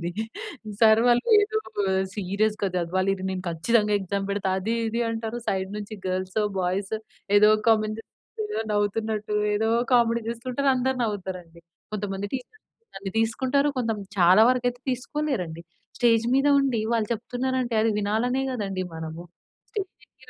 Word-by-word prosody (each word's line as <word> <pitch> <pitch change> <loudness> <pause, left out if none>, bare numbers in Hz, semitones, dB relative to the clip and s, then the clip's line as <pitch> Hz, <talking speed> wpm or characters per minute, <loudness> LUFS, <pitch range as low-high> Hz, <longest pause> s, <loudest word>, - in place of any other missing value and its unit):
ఇది. 220 +1 -2 0.6
సర్ 220 0 +7
వాళ్ళు 240 0 +3
ఏదో 435 +1 0 0.6
సీరియస్‌గా 205 +1 0
చదవాలి, 185 +3 +1 0.2
నేను 185 -1 -3
ఖచ్చితంగా 210 +6 +2
ఎగ్జామ్ 195 +1 -2
పెడతా 200 -1 -1
అది 225 +4 -1
ఇది 230 +2 -2
అంటారు. 225 +1 -4
సైడ్ 190 0 -1
నుంచి 210 +1 -7
గల్సో 185 +3 -1 0.2
బాయ్స్ 190 +4 -1 0.4
ఏదో 210 +1 +6 0.2
కామెంట్ 215 0 +2 0.7
నవ్వుతున్నట్టు 210 +1 -1 0.2
ఏదో 220 +1 +1 0.2
కామెడీ 235 -1 +4
చూస్తుంటారు 255 +4 -2
అందరు 260 +1 0
నవ్వుతారు 190 -4 -3
అండి. 170 0 -18 0.3
కొంతమంది 200 -1 -3
టీచర్స్ 260 - -8
తీసుకుంటారు 260 +5 +1
కొంత 235 -3 0 0.3
చాలా 185 +5 +7
వరకు 250 -1 +2
అయితే 245 0 -6
తీసుకోలేరు 260 -3 -2
అండి. 160 +1 -9 0.4
స్టేజ్ 230 -2 +4
మీద 275 +2 +3
ఉండి 255 -5 +1
వాళ్ళు 220 -2 +1
చెప్తున్నారు 250 +3 -2
అంటే 240 -2 -3
అది 225 - +3
వినాలనే 235 +6 0
కదండి 195 -5 -3
మనము. 160 +1 -6 0.5
స్టేజ్ 395 -4 -8
220 Hz, 135 wpm, -25 LUFS, 195-245 Hz, 0.7 s, సర్